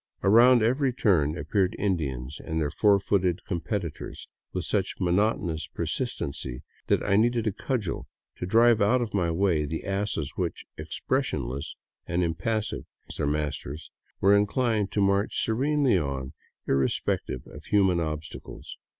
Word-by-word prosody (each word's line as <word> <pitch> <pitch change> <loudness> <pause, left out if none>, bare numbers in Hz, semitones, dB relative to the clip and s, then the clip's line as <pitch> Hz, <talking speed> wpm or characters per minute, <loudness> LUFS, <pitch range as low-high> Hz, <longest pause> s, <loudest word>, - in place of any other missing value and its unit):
Around 120 +4 +6
every 130 +4 +2
turn 90 - +2
appeared 95 +6 0
Indians 75 -8 -2
and 80 -1 -2
their 75 -2 -1
four 100 +4 +4
footed 95 -3 0
competitors, 85 -3 -4 0.2
with 90 - -3
such 95 +1 0
monotonous 90 -4 +1
persistency 65 -4 -3 0.2
that - - +2
I 100 - +2
needed 120 +1 +2
a 110 - +2
cudgel 110 -2 -3 0.3
to 90 - -4
drive 115 +2 +5
out 120 +5 +3
of 115 - -6
my 90 -4 +1
way 85 -2 +2
the 80 +3 -4
asses 100 -6 -2
which, - - -3
expressionless 65 +4 -2 0.3
and 90 +1 0
impassive 110 +6 -2 0.2
as - - -7
their - - 0
masters, 75 0 -3 0.3
were 100 +1 +5
inclined 105 0 +1
to 105 - +1
march 100 +1 +2
serenely 135 -1 +2
on, 70 -3 -4 0.3
irrespective 65 -2 0
of - - -12
human 95 -4 +3
obstacles. 75 -1 -6
95 Hz, 140 wpm, -27 LUFS, 80-110 Hz, 0.3 s, Around